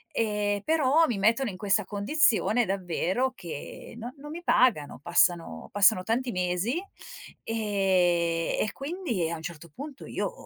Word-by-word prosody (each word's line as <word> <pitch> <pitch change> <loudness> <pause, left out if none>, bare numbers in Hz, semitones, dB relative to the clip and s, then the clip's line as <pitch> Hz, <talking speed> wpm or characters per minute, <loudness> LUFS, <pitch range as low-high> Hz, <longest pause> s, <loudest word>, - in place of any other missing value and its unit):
Ehm, 210 -2 0
però 315 0 +3
mi 230 - -2
mettono 230 +5 +2
in 185 - -8
questa 205 0 +1
condizione 225 - +2
davvero 190 +6 -1
che 170 +3 -8
no 240 +2 -7
non 295 +2 -10
mi 345 +2 -7
pagano, 210 - +2
passano 170 - +1
passano 205 -1 +4
tanti 240 +4 -1
mesi, 180 - -1 0.7
ehm, 185 -6 +1
e 215 - -2
quindi 275 - -3
a - - -2
un - - -10
certo 170 0 -8
punto 280 0 -9
io - - -3
205 Hz, 145 wpm, -27 LUFS, 180-250 Hz, 0.7 s, passano